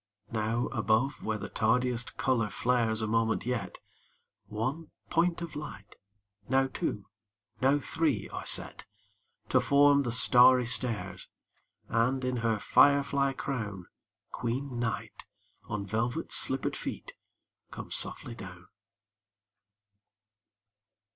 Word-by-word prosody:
Now 115 +2 -1
above 115 +6 +1
where 110 -1 -2
the - - -6
tardiest 120 +2 0
color 115 -5 +1
flares 115 -3 +1
a - - -1
moment 115 0 0
yet, 125 -1 -3 0.7
One 130 +10 -3 0.2
point 170 0 +1
of 170 - -7
light, 125 -9 -8 0.5
now 135 +1 +3
two, 105 -6 -4 0.6
now 135 +2 +4
three 155 +1 -1
are - - -6
set - - 0 0.6
To - - +4
form 140 0 +5
the 120 -4 -2
starry 125 +1 +6
stairs,— 115 -6 -1 0.6
And, 125 +3 +1
in 125 -1 -1
her 115 -2 0
fire 140 +6 +5
fly 140 -1 0
crown, 105 -10 -4 0.5
Queen 125 +1 -3
Night, 115 -2 -4 0.4
on 105 -1 -4
velvet 115 +4 -2
slippered - - +1
feet, - - -6 0.6
comes - - -7
softly 120 - -3
down. 90 -5 -11
120 Hz, 115 wpm, -29 LUFS, 110-135 Hz, 0.7 s, starry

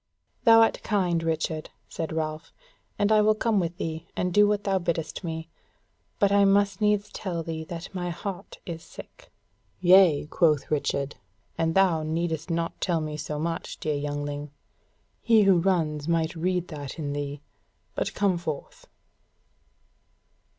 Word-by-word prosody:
"Thou 225 -1 +8
art 225 - +2
kind, 180 -5 +1
Richard," 160 -1 -2 0.2
said 160 - -4
Ralph; 155 0 -3 0.5
"and 205 +1 +2
I 215 -1 +6
will 215 +1 +4
come 220 -2 +1
with 170 -1 -2
thee, 160 0 -4
and 180 -1 -1
do 205 +2 +6
what 205 0 0
thou 195 -1 +1
biddest 170 0 -3
me; 160 -1 -4 0.7
but 200 -1 +3
I 200 0 +5
must 200 0 +3
needs 210 0 +2
tell 175 -4 -4
thee 160 -1 -4
that 170 +3 -7
my 175 -1 -3
heart 185 +2 -6
is 165 -2 -6
sick." - - -13 0.5
"Yea," 180 -5 +6
quoth 150 -2 +1
Richard, 140 -1 -1 0.4
"and 165 0 0
thou 185 -5 +4
needest 160 +1 -2
not 165 0 -2
tell 170 -2 +1
me 155 -1 -4
so 150 0 -4
much, 165 +2 -4
dear 155 - -1
youngling; 145 0 -3 0.7
he 225 -2 +5
who 195 -3 +5
runs 160 -5 0
might 165 -1 0
read 180 +1 -1
that 145 -3 -7
in 145 -3 -3
thee. 145 0 -4 0.5
But - - -3
come 195 -3 +1
forth." 155 -4 -6
170 Hz, 155 wpm, -26 LUFS, 155-195 Hz, 0.7 s, Thou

